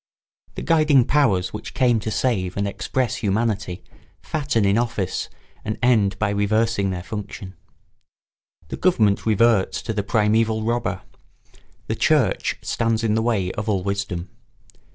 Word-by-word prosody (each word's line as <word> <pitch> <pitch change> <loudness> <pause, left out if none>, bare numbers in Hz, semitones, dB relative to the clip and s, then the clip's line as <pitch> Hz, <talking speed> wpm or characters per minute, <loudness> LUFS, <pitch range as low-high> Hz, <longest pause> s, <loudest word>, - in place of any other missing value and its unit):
The - - -5
guiding 155 -6 +4
powers 100 -12 +2
which 105 - -7
came 120 -3 +3
to 110 - -4
save 100 -6 -1
and 100 0 0
express 125 +4 -2
humanity 105 -3 -1 0.4
fatten 140 -8 -1
in 100 +1 +3
office 115 -6 -2 0.3
and 110 - -3
end 105 -6 +3
by 105 -1 0
reversing 105 0 +1
their 90 -2 -4
function. 100 -2 -7 1.2
The - - -5
government 110 - +2
reverts 110 -2 +3
to 110 - -3
the 105 - -1
primeval 110 +2 +1
robber; 115 -5 -1 0.8
the - - -2
church - - +1
stands 115 0 0
in 110 -2 +1
the 110 - +1
way 105 -6 0
of 105 +1 -4
all 95 -3 0
wisdom. 100 -3 -3
110 Hz, 140 wpm, -22 LUFS, 100-115 Hz, 1.2 s, guiding